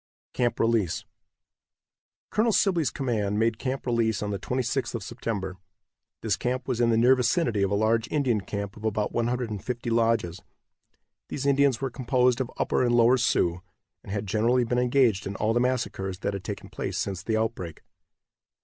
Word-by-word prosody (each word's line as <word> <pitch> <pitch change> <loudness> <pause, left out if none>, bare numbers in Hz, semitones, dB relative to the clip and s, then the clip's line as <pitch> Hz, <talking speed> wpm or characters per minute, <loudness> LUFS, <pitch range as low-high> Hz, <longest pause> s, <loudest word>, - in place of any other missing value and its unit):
CAMP 120 -1 0
RELEASE. 115 -7 +1 1.3
Colonel 225 +2 +2
Sibley's 180 -8 +2
command 110 -6 -1
made 115 0 +1
Camp 135 0 -3
Release 115 -3 +1
on 105 - -2
the 100 - -3
26th 130 0 -2
of 115 - -4
September. 100 -4 -4 0.7
This 110 -3 +1
camp 125 +6 -2
was 125 -2 -1
in 120 - +4
the 115 - +3
near 120 +3 +6
vicinity 125 - +1
of 100 - +2
a 100 - +1
large 110 +2 +2
Indian 130 -8 +1
camp 100 0 -5
of 105 - -12
about 110 -1 -1
150 120 0 -2
lodges. 115 -6 +1 0.9
These 140 - -4
Indians 140 -3 +3
were 135 -2 -2
composed 125 0 +2
of 130 - -3
Upper - - +1
and 120 -1 +2
Lower 120 +2 +5
Sioux, 90 -8 +1 0.4
and - - -9
had 105 +1 -2
generally 115 +5 +2
been 125 +1 0
engaged 125 -6 +2
in 100 - -5
all 110 +3 +1
the 120 - +2
massacres 120 -7 -1
that 100 - -1
had 100 -2 -5
taken - - -6
place - - -4
since 95 -3 -2
the 110 -1 -1
outbreak. 110 -8 -3
115 Hz, 175 wpm, -26 LUFS, 105-125 Hz, 1.3 s, near